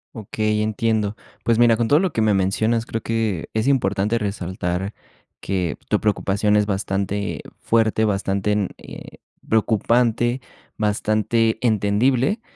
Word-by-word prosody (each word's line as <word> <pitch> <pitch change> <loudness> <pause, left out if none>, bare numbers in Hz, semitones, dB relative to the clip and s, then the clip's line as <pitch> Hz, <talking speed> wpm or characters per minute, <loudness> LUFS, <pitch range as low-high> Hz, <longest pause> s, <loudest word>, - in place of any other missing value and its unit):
Okey, 110 0 -1
entiendo, 110 -1 0 0.3
pues, 115 -1 +2
mira, 120 -2 +5
con 115 -1 0
todo 145 +5 +5
lo 190 -1 0
que 110 - 0
me 105 - +3
mencionas, 110 +4 +1
creo 115 - -3
que 110 -7 -2
es 110 +4 0
importante 105 -4 +1
resaltar 95 -2 -3 0.4
que 90 -5 -2
tu - - +1
preocupación 105 0 +1
es 105 - +3
bastante 100 0 -2 0.2
fuerte, 110 -1 +2
bastante 100 0 0
n 105 -3 0
eh, - - -11 0.3
preocupante, 120 +3 +1 0.4
bastante 110 +2 +1
entendible, 120 - +1
110 Hz, 130 wpm, -21 LUFS, 100-115 Hz, 0.4 s, mira